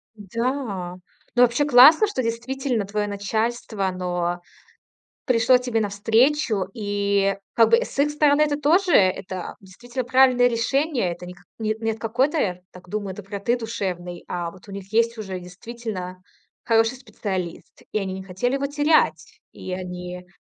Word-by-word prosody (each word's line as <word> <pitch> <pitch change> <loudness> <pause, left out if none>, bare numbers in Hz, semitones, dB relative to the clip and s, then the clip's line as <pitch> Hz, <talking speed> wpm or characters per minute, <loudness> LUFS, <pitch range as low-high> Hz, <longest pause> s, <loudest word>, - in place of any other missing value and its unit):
Да. 215 -3 -3 0.4
Ну, 245 - +6
вообще 245 +4 +3
классно, 295 - +8
что 410 -10 -2
действительно 235 0 -2
твое 205 +1 -2
начальство, 215 +1 -2
оно 180 -1 -2 0.8
пришло 250 0 +4
тебе 245 -3 -1
навстречу. 220 +2 +2
И 200 -2 0 0.2
как 225 -1 +5
бы 230 - +7
с - - -10
их 290 +1 +3
стороны 295 0 +3
это 295 -1 +1
тоже 345 +5 +3
это 185 -1 +1
действительно 240 +7 -6
правильное 255 0 +5
решение. 245 - 0
Это 175 +1 -9
не 180 - -9
какой 215 +3 -5
не 225 - +2
от 220 - -8
какой-то, 225 - 0
так 180 0 -15
думаю, 200 -1 -4
доброты 200 +4 -2
душевной, 180 -6 -5
а 175 -1 -3
вот 185 +3 -17
у - - -9
них 200 0 -9
есть 230 +1 +2
уже 195 -4 -5
действительно 185 -1 -7 0.4
хороший 225 +2 +2
специалист, 190 -8 -6
и - - +1
они 190 -2 -3
не 190 0 -7
хотели 190 +8 -2
его 275 0 0
терять. 295 +2 +1
И 185 - -8
они 180 0 -6
220 Hz, 150 wpm, -23 LUFS, 190-250 Hz, 0.8 s, классно